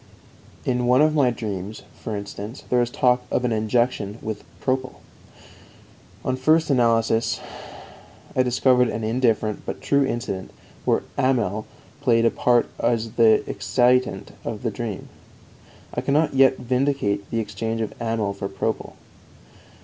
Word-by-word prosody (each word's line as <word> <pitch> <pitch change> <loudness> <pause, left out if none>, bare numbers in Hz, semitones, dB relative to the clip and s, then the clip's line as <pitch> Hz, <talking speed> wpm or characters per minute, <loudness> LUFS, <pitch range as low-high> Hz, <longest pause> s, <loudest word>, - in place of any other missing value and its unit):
In 125 -1 0
one 125 +4 +5
of 155 0 +3
my 140 -5 +4
dreams, 105 -3 -5
for 110 - -6
instance, 100 +4 -7
there 125 -1 +4
is 120 - 0
talk 125 0 +2
of 125 - 0
an 120 - +1
injection 110 -1 0
with 110 -1 -4 0.2
propyl. 130 -1 -1 1.3
On 130 - +1
first 155 +4 +3
analysis 115 -2 +2 1.0
I 130 - +4
discovered 125 0 +3
an 110 - -3
indifferent 110 -2 +1
but - - -5
true 140 0 +2
incident 120 -7 -3 0.4
where - - +2 0.2
amyl 120 -6 +1 0.3
played 115 -4 +3
a 115 - +4
part 120 -1 +3
as 115 -2 0
the 110 -1 +4
excitant 125 +1 +1
of - - -5
the - - 0
dream. - - -5 0.9
I 125 - -1
cannot 145 +4 +2
yet 135 -1 +5
vindicate 125 -6 0
the 115 - -1
exchange 115 +1 -3
of 110 -2 -3
amyl 115 -3 -1
for 100 0 -5
propyl. 95 - -3
120 Hz, 140 wpm, -23 LUFS, 110-130 Hz, 1.3 s, one